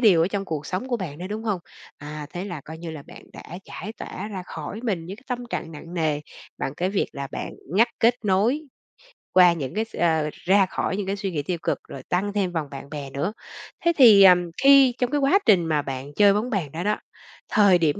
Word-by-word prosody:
điều 195 Hz, -9 st, +6 dB
ở 170 Hz, -, +2 dB
trong 200 Hz, -1 st, -3 dB
cuộc 155 Hz, -5 st, -4 dB
sống 185 Hz, +8 st, -3 dB
của 245 Hz, -, 0 dB
bạn 165 Hz, -7 st, -6 dB
nữa, 180 Hz, -, -5 dB
đúng 215 Hz, +2 st, -5 dB
hông? 205 Hz, -5 st, -1 dB, 0.4 s
À, 150 Hz, 0 st, -7 dB
thế 180 Hz, +1 st, -4 dB
là 175 Hz, -7 st, -6 dB
coi 160 Hz, +3 st, -10 dB
như 165 Hz, -1 st, -6 dB
là 155 Hz, -3 st, -8 dB
bạn -, -, -13 dB
đã 175 Hz, -, -9 dB
giải 215 Hz, -, -7 dB
tỏa 215 Hz, -, -7 dB
ra 190 Hz, -3 st, -5 dB
khỏi 160 Hz, +8 st, -6 dB
mình 185 Hz, -8 st, -2 dB
những 195 Hz, -, -7 dB
cái 250 Hz, -, -19 dB
tâm 250 Hz, -2 st, -2 dB
trạng 165 Hz, -, -4 dB
nặng 165 Hz, +3 st, -10 dB
nề, 155 Hz, -3 st, 0 dB, 0.4 s
bằng 135 Hz, -, -3 dB
cái 180 Hz, +4 st, -1 dB
việc 200 Hz, -, 0 dB
là 140 Hz, 0 st, -5 dB
bạn -, -, -4 dB, 0.2 s
ngắt 230 Hz, +5 st, +5 dB
kết 230 Hz, +1 st, +5 dB
nối 210 Hz, +10 st, +2 dB, 0.7 s
qua 180 Hz, -2 st, +7 dB
những 140 Hz, -6 st, -5 dB
cái 220 Hz, +1 st, 0 dB
s -, -, -14 dB
ơ 160 Hz, -3 st, +1 dB
ra 195 Hz, +1 st, +3 dB
khỏi 190 Hz, +1 st, -2 dB
những 200 Hz, -2 st, -3 dB
cái 200 Hz, -, -1 dB
suy 195 Hz, -1 st, -3 dB
nghĩ 145 Hz, -3 st, -2 dB
tiêu 175 Hz, +2 st, -2 dB
cực -, -, 0 dB
rồi 135 Hz, -, -8 dB
tăng 200 Hz, +3 st, 0 dB
thêm 195 Hz, -4 st, 0 dB
vòng 160 Hz, -4 st, -2 dB
bạn 140 Hz, 0 st, -8 dB
bè 145 Hz, -2 st, -6 dB
nữa. 145 Hz, +10 st, -2 dB, 0.5 s
Thế 340 Hz, -, +4 dB
thì, 215 Hz, -7 st, +9 dB
ờm, 180 Hz, -2 st, +6 dB
khi 275 Hz, -2 st, +7 dB
trong 250 Hz, 0 st, 0 dB
cái 295 Hz, -, +1 dB
quá 280 Hz, +8 st, +4 dB
trình 185 Hz, -7 st, +5 dB
mà 155 Hz, -2 st, +1 dB
bạn 135 Hz, +1 st, -6 dB
chơi 205 Hz, -1 st, +6 dB
bóng 215 Hz, +5 st, -1 dB
bàn 185 Hz, -, -2 dB
đó 165 Hz, +2 st, -4 dB
đó, 210 Hz, +2 st, +1 dB, 0.5 s
thời 200 Hz, -4 st, +5 dB
điểm 160 Hz, -4 st, +1 dB
185 Hz, 245 wpm, -24 LUFS, 160-210 Hz, 0.7 s, thì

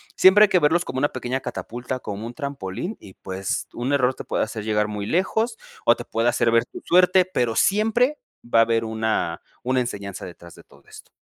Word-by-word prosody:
siempre 190 Hz, +3 st, +7 dB
hay -, -, -5 dB
que 180 Hz, -, +4 dB
verlos 165 Hz, +4 st, +2 dB
como 130 Hz, -, -3 dB
una 145 Hz, -, +2 dB
pequeña 130 Hz, +1 st, -3 dB
catapulta, 125 Hz, +2 st, -5 dB
como 105 Hz, 0 st, -6 dB
un 120 Hz, -, -8 dB
trampolín 140 Hz, -, -5 dB
y, 95 Hz, -, -13 dB
pues, 95 Hz, 0 st, -4 dB
un 125 Hz, +4 st, -2 dB
error 130 Hz, -2 st, +3 dB
te -, -, -7 dB
puede -, -, 0 dB
hacer 110 Hz, -1 st, -5 dB
llegar 105 Hz, -1 st, +1 dB
muy 105 Hz, -1 st, -4 dB
lejos 220 Hz, +6 st, 0 dB, 0.3 s
o 120 Hz, -, +6 dB
te -, -, -8 dB
puede 115 Hz, +1 st, -1 dB
hacer 120 Hz, -1 st, +2 dB
ver 115 Hz, 0 st, +4 dB
tu -, -, -10 dB
suerte, 180 Hz, +1 st, +5 dB
pero 120 Hz, -11 st, -1 dB
siempre 225 Hz, -, +2 dB, 0.3 s
va 115 Hz, -1 st, +3 dB
a -, -, +8 dB
haber 115 Hz, 0 st, 0 dB
una 110 Hz, -6 st, -1 dB, 0.2 s
una 130 Hz, +1 st, +1 dB
enseñanza 100 Hz, -5 st, -5 dB
detrás 85 Hz, -1 st, -12 dB
de -, -, -15 dB
todo -, -, -22 dB
esto. -, -, -14 dB
120 Hz, 215 wpm, -23 LUFS, 110-175 Hz, 0.3 s, a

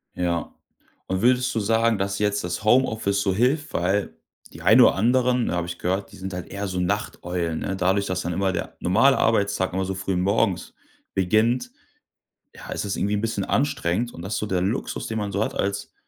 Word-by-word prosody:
Ja, 85 Hz, -2 st, -2 dB, 0.5 s
und 95 Hz, +1 st, -1 dB
würdest 125 Hz, +1 st, +3 dB
du -, -, +2 dB
sagen, 115 Hz, +1 st, +2 dB
dass 100 Hz, 0 st, -2 dB
jetzt 105 Hz, -2 st, 0 dB
das 90 Hz, +3 st, -4 dB
Homeoffice 110 Hz, -4 st, +2 dB
so 95 Hz, -2 st, +1 dB
hilft? 135 Hz, +7 st, +1 dB
Weil 95 Hz, +4 st, 0 dB, 0.4 s
die -, -, -11 dB
ein -, -, +6 dB
oder -, -, +6 dB
anderen, 125 Hz, +3 st, +2 dB
habe 85 Hz, -1 st, -1 dB
ich 85 Hz, 0 st, -6 dB
gehört, 95 Hz, +2 st, -2 dB
die -, -, -13 dB
sind 95 Hz, 0 st, -6 dB
halt 90 Hz, -1 st, -5 dB
eher 100 Hz, 0 st, -4 dB
so 90 Hz, -1 st, -3 dB
Nachteulen, 90 Hz, -1 st, -2 dB
ne? 95 Hz, -, -3 dB
Dadurch, 95 Hz, +2 st, +1 dB
dass 90 Hz, 0 st, -1 dB
dann 85 Hz, +1 st, -3 dB
immer 95 Hz, +1 st, 0 dB
der -, -, -4 dB
normale 115 Hz, +9 st, +4 dB
Arbeitstag 100 Hz, -4 st, +1 dB
immer 95 Hz, 0 st, -1 dB
so 95 Hz, -, -3 dB
früh 95 Hz, 0 st, -2 dB
morgens 100 Hz, +1 st, 0 dB, 0.4 s
beginnt, 115 Hz, +6 st, +1 dB, 0.8 s
ja, -, -, -10 dB
ist -, -, -3 dB
es 100 Hz, -, -2 dB
irgendwie 100 Hz, +1 st, 0 dB
'n 105 Hz, -, 0 dB
bisschen 110 Hz, -3 st, -2 dB
anstrengend 120 Hz, -5 st, 0 dB
und 85 Hz, -, -9 dB
dass 95 Hz, +5 st, -3 dB
so 105 Hz, -, -2 dB
der 95 Hz, -2 st, 0 dB
Luxus, 100 Hz, +8 st, -2 dB
den 110 Hz, 0 st, -3 dB
man 100 Hz, -1 st, -2 dB
so 100 Hz, +2 st, 0 dB
hat -, -, -4 dB
als 100 Hz, 0 st, -2 dB
100 Hz, 205 wpm, -24 LUFS, 90-115 Hz, 0.8 s, ein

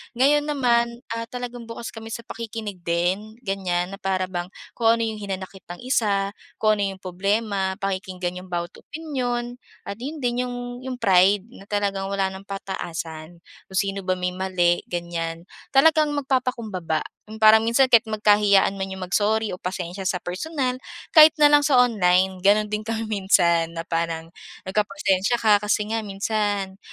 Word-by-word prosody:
Ngayon 290 Hz, +4 st, +3 dB
naman, 240 Hz, -4 st, +1 dB
ah, 230 Hz, 0 st, -3 dB
talagang 245 Hz, -1 st, -7 dB
bukas 230 Hz, 0 st, -7 dB
kami 225 Hz, 0 st, -9 dB
sa 230 Hz, +1 st, -6 dB
pakikinig 220 Hz, -4 st, -6 dB
din, 185 Hz, +6 st, -1 dB
ganyan 185 Hz, -3 st, -1 dB
na 195 Hz, -, -8 dB
para 190 Hz, -2 st, 0 dB
bang 175 Hz, -1 st, -3 dB, 0.2 s
kung 230 Hz, -, -1 dB
ano 230 Hz, -, -1 dB
yung 220 Hz, -1 st, -3 dB
hinanakit 190 Hz, -1 st, -7 dB
ng 175 Hz, +6 st, -9 dB
isa, 200 Hz, -6 st, +1 dB, 0.2 s
kung 215 Hz, -1 st, +2 dB
ano 195 Hz, -1 st, -1 dB
yung 190 Hz, -, -21 dB
problema 195 Hz, +1 st, -1 dB
pakikinggan 185 Hz, -2 st, -4 dB
yung 185 Hz, -, -12 dB
bawat 175 Hz, -1 st, -3 dB
opinyon 250 Hz, -6 st, -4 dB, 0.2 s
at 200 Hz, +2 st, -7 dB
'yon 285 Hz, +3 st, -6 dB
din 245 Hz, +1 st, 0 dB
yung 245 Hz, -, -5 dB, 0.2 s
yung 260 Hz, 0 st, -5 dB
pride 195 Hz, -3 st, +4 dB
na 200 Hz, -5 st, -14 dB
talagang 200 Hz, -2 st, -1 dB
wala 195 Hz, -1 st, -1 dB
ng 190 Hz, +1 st, -10 dB
pataasan. 170 Hz, -4 st, -6 dB, 0.2 s
Kung 190 Hz, -, -10 dB
sino 195 Hz, +1 st, +1 dB
ba 185 Hz, -1 st, -1 dB
may 180 Hz, 0 st, -2 dB
mali 180 Hz, -2 st, 0 dB
ganyan, 170 Hz, -1 st, -4 dB, 0.3 s
talagang 305 Hz, +2 st, +5 dB
magpapakumbaba. 240 Hz, -, -1 dB, 0.3 s
Yung 220 Hz, +1 st, -7 dB
parang 215 Hz, +1 st, +9 dB
minsan 235 Hz, +4 st, +2 dB
kahit 230 Hz, -2 st, +6 dB
magkahiyaan 210 Hz, -2 st, +3 dB
man 190 Hz, -, -2 dB
yung 190 Hz, -1 st, -6 dB
mag-sorry 210 Hz, +4 st, +1 dB
o 180 Hz, -, -6 dB
pasensiya 180 Hz, +1 st, -4 dB
sa 180 Hz, -, 0 dB
personal, 255 Hz, -, -3 dB, 0.3 s
kahit 310 Hz, -1 st, +9 dB
na 295 Hz, -2 st, +5 dB
lang 295 Hz, -, +7 dB
sa 280 Hz, -, +3 dB
online 190 Hz, -6 st, +3 dB
gano'n 205 Hz, +3 st, +3 dB
din 215 Hz, +1 st, -3 dB
kami 225 Hz, 0 st, -2 dB
minsan 180 Hz, -6 st, +2 dB
na 165 Hz, -, -4 dB
parang 165 Hz, 0 st, -3 dB, 0.3 s
nagpapasensya 200 Hz, +1 st, +1 dB
ka 215 Hz, -3 st, +4 dB
kasi 210 Hz, +1 st, -1 dB
nga 225 Hz, -, 0 dB
minsan 200 Hz, -1 st, -2 dB
200 Hz, 165 wpm, -23 LUFS, 185-230 Hz, 0.3 s, parang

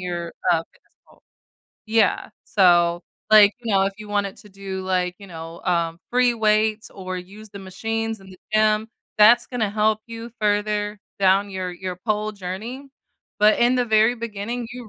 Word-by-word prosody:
your, 175 Hz, -2 st, -4 dB, 0.2 s
uh, 175 Hz, -, +5 dB
dance 165 Hz, -, -11 dB
pole -, -, -23 dB, 0.6 s
Yeah. 220 Hz, -1 st, +1 dB
So, 175 Hz, -4 st, +3 dB, 0.3 s
like, 210 Hz, -1 st, +8 dB
you 230 Hz, -3 st, -3 dB
know, 195 Hz, -, +4 dB
if 195 Hz, -, -1 dB
you 215 Hz, -, -10 dB
wanted 205 Hz, -1 st, -1 dB
to 210 Hz, -, -15 dB
do, 195 Hz, -1 st, -6 dB
like, 180 Hz, -1 st, -1 dB
you 200 Hz, -, -12 dB
know, 165 Hz, 0 st, -9 dB
uh, 170 Hz, -2 st, -1 dB
free 250 Hz, 0 st, +3 dB
weights 215 Hz, 0 st, +1 dB
or 185 Hz, -1 st, -6 dB
use 200 Hz, +4 st, -12 dB
the 200 Hz, -, -9 dB
machines 225 Hz, +3 st, -4 dB
in 190 Hz, 0 st, -15 dB
the 185 Hz, -, -14 dB, 0.2 s
gym, 215 Hz, 0 st, +2 dB, 0.3 s
that's 215 Hz, +3 st, +6 dB
gonna 235 Hz, -4 st, -2 dB
help 215 Hz, +1 st, +1 dB
you 230 Hz, 0 st, -8 dB
further 210 Hz, 0 st, 0 dB, 0.2 s
down 195 Hz, +1 st, +3 dB
your 185 Hz, -1 st, -4 dB
your 180 Hz, 0 st, -6 dB
pole 215 Hz, +2 st, -2 dB
journey. 210 Hz, +8 st, -7 dB, 0.5 s
But 210 Hz, +1 st, +4 dB
in 240 Hz, +2 st, +4 dB
the 250 Hz, -, +2 dB
very 220 Hz, +1 st, +3 dB
beginning, 230 Hz, +1 st, -5 dB
you 245 Hz, -3 st, -9 dB
210 Hz, 175 wpm, -22 LUFS, 185-220 Hz, 0.6 s, like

